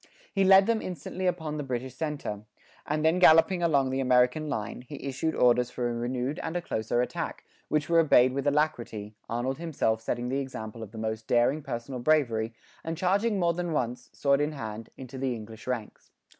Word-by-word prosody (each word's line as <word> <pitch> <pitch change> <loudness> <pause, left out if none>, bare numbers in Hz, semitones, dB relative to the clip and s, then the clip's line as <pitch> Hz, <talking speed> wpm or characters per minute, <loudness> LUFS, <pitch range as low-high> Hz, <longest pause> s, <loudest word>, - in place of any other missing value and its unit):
He 195 - +2
led 190 0 +7
them 230 0 +1
instantly 185 +2 -4
upon 160 -4 -2
the 150 - -3
British 130 -1 -4
centre; 145 -7 -4 0.5
and 155 +1 0
then 165 +3 +3
galloping 175 +1 +6
along 140 -6 +2
the 130 - -1
American 125 +4 +3
line, 110 0 -3
he 140 +3 -10
issued 140 +4 -2
orders 125 0 +4
for 125 -1 -2
a 120 - -2
renewed 125 +4 -2
and 165 - -3
a - - -2
closer 115 0 0
attack, - - -4 0.2
which 150 -1 0
were 170 0 +4
obeyed 130 -5 +5
with 140 +1 -2
alacrity, 120 -8 -1 0.2
Arnold 125 +4 -2
himself 135 -9 0
setting 120 +2 -2
the 135 +2 0
example 115 -4 -6
of 110 -3 -8
the 110 - -10
most 110 0 -3
daring 125 +5 +3
personal 130 -2 -5
bravery, 120 -6 +1 0.3
and 165 0 -4
charging 200 +5 +1
more 170 -2 +2
than 175 -1 -3
once, 125 -3 -2
sword 140 0 +2
in 150 +1 0
hand, 110 -4 -6
into 130 0 -8
the 130 -2 -1
English 110 +1 -10
ranks. 120 -4 -5
135 Hz, 195 wpm, -28 LUFS, 120-155 Hz, 0.5 s, led